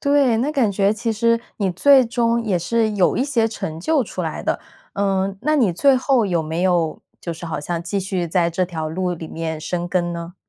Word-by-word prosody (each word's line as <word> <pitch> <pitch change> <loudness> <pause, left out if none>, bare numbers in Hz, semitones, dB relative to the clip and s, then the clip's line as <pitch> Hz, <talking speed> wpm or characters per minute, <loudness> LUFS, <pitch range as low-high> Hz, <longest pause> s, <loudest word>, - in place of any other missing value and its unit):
对 280 -5 +3
那 260 +6 0
感 255 -8 +2
觉 200 +1 +2
其 230 +1 -2
实 230 +1 +2 0.2
你 195 -3 0
最 265 +7 +5
终 235 0 +1
也 195 -5 +1
是 220 +5 0
有 195 -3 +2
一 255 - +1
些 235 -6 +1
成 160 -7 -5
就 300 - +2
出 - - -5
来 - - -4
的。 - - -1 0.3
嗯， 195 -1 0
那 305 +2 +2
你 220 -10 +3
最 270 +9 +4
后 255 -3 +2
有 175 -4 +1
没 160 +2 -3
有 175 -4 +1 0.2
就 170 - -4
是 165 +1 -9
好 165 - -3
像 170 +2 -3
继 200 +3 -2
续 185 -2 -2
在 170 0 +2
这 180 +2 0
条 160 -3 -4
路 180 +2 -2
里 165 -1 -6
面 160 -1 -4
深 175 +2 -3
耕 175 -1 0
呢？ 170 +1 -7
195 Hz, 240 characters per minute, -21 LUFS, 170-230 Hz, 0.3 s, 最